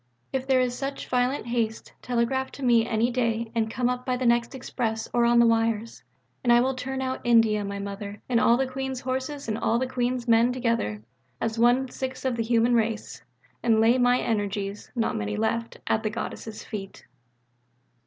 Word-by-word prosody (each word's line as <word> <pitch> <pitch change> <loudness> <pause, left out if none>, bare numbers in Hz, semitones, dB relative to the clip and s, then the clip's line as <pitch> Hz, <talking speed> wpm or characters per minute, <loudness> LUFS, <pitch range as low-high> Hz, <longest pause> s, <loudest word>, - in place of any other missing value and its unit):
If 265 0 -2
there 265 -1 +4
is 250 -1 0
such 275 +2 -5
violent 250 +2 0
haste, 230 -2 -2
telegraph 250 +2 -1
to 280 - -8
me 235 -2 +4
any 230 +2 +1
day 230 -2 -1
and 225 -2 0
come 245 +2 0
up 250 0 -1
by 255 -1 -1
the 255 - -2
next 235 +2 +2
express 225 -3 -3
or 240 -1 +3
on 240 0 +4
the 235 - +7
wires. 230 -1 0 0.4
And 240 - +3
I 240 - +7
will 260 +2 +1
turn 265 +1 -4
out 260 0 -3
India, 225 -3 +4
my 200 0 -4
Mother, 200 +1 -6
and 240 -2 +2
all 235 +1 +4
the 265 - +1
Queen's 265 0 -4
horses 265 +2 -3
and 220 0 -2
all 230 0 +1
the 260 - 0
Queen's 250 -1 -2
men 230 +1 +4
together, 230 - -1 0.4
with 225 0 -2
one 245 +3 +4
sixth 260 +1 -5
of 255 -2 +1
the 230 - -1
human 230 +1 +2
race, 225 -2 -1 0.4
and 225 -2 +3
lay 230 +3 +4
my 245 0 +4
energies 205 -2 -2
(not 230 -2 0
many 105 0 -2
left) 230 +1 -1
at 220 - +1
the 215 - -1
Goddess' 220 0 -6
feet. 195 -3 -8
235 Hz, 195 wpm, -26 LUFS, 225-255 Hz, 0.4 s, the